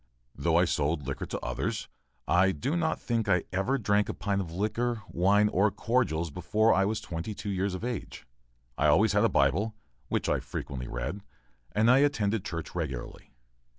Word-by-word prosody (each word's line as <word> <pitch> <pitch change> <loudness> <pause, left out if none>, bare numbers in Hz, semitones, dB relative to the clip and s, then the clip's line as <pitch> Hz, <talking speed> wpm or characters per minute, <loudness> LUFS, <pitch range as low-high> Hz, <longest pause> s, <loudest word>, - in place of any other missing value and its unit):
Though 80 +4 0
I 90 - +5
sold 75 -2 0
liquors 70 0 -4
to - - -4
others, - - -3 0.4
I 90 +2 +4
do 135 - -2
not 165 -2 0
think 115 -3 -1
I 90 -2 +3
ever 100 +9 +1
drank 105 -3 +1
a - - -3
pint 100 -1 -1
of 85 -4 -6
liquor, 110 +5 -1
wine, 100 +4 +3
or 100 +3 +3
cordials 95 - 0
before 105 +8 +2
I 95 - +3
was 105 +1 -1
twenty 85 +5 -5
two 100 - -4
years 95 0 -1
of 95 - -7
age. 120 -5 -5 0.5
I - - +4
always - - +4
had - - +3
a - - +4
Bible, 95 +11 +2 0.3
which - - -1
I - - +2
frequently 65 -3 -6
read, 70 +12 -4 0.5
and 110 +3 +4
I 130 - +6
attended 110 -8 +1
church 85 -2 -5
regularly. 75 -8 -5
100 Hz, 185 wpm, -29 LUFS, 85-110 Hz, 0.5 s, I